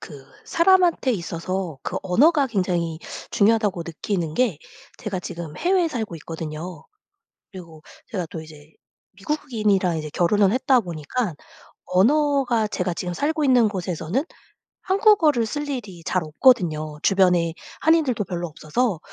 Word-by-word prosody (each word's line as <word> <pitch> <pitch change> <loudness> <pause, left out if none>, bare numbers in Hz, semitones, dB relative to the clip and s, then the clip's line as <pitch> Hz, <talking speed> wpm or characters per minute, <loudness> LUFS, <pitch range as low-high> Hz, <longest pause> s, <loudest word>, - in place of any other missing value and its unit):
그 140 -4 -11 0.2
사람한테 345 -6 +3
있어서 170 - -4
그 - - -3
언어가 275 - +3
굉장히 175 -6 -1 0.3
중요하다고 205 -4 +2
느끼는 170 -1 -3
게 230 -10 +1 0.4
제가 195 -4 -4
지금 170 -4 -7
해외에 365 -1 +2
살고 220 - -4
있거든요. 160 +1 -7 0.7
그리고 170 -6 -12 0.2
제가 180 -6 -4
또 160 - -6
이제 155 -1 -14 0.4
미국인이랑 210 - 0
이제 155 -1 -5
결혼을 195 +4 +2
했다 260 +1 +3
보니깐 175 - -3 0.5
언어가 250 +2 +2
제가 180 -4 -2
지금 180 +1 -4
살고 305 - -1
있는 250 -4 +5
곳에서는 185 - -2 0.6
한국어를 375 - +3
쓸 290 +5 -4
일이 205 -11 -6
잘 185 - 0
없거든요. 155 - +2
주변에 180 -4 +3 0.3
한인들도 310 -8 +3
별로 175 -1 -4
없어서 165 +6 -1
190 Hz, 310 characters per minute, -23 LUFS, 170-255 Hz, 0.7 s, 있는